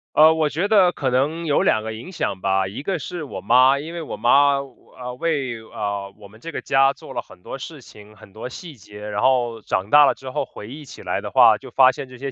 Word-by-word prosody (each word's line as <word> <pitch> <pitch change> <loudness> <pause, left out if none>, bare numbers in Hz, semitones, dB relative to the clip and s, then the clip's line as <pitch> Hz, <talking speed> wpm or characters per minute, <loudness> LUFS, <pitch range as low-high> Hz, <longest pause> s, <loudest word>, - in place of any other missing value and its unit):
呃， 155 +1 +7
我 160 -2 0
觉 170 +7 -1
得 195 -4 +5
可 135 -6 -2
能 150 +7 0
有 145 -3 +2
两 110 - +2
个 110 0 -5
影 115 +12 -9
响 100 - -3
吧， 95 0 +1
一 100 +7 -7
个 185 +5 -2
是 170 +1 -6
我 145 - -7
妈， 130 +3 +4
因 160 +4 -7
为 170 - -5
我 155 - -7
妈， 140 +3 +4
呃， 125 -2 -9
为， 140 -8 -2
呃， 100 -2 -5
我 105 -1 -13
们 110 +2 -18
这 165 +8 -8
个 - - -5
家 135 0 +3
做 - - -12
了 - - -3
很 90 - -19
多 - - -7
事 150 +3 -9
情、 105 -2 -16
很 100 - -17
多 110 +4 -7
细 160 +3 -10
节， 105 -1 -11
然 105 0 -3
后 120 -3 +1
长 95 0 -3
大 145 0 +8
了 - - +1
之 130 -1 -9
后 - - -2
回 105 - -11
忆 145 +6 -10
起 135 - -12
来 - - -2
的 - - -6
话， - - +5
就 - - -12
发 130 -1 +5
现 130 - -8
这 130 - -12
些 135 +2 -5
130 Hz, 280 characters per minute, -21 LUFS, 110-150 Hz, -, 大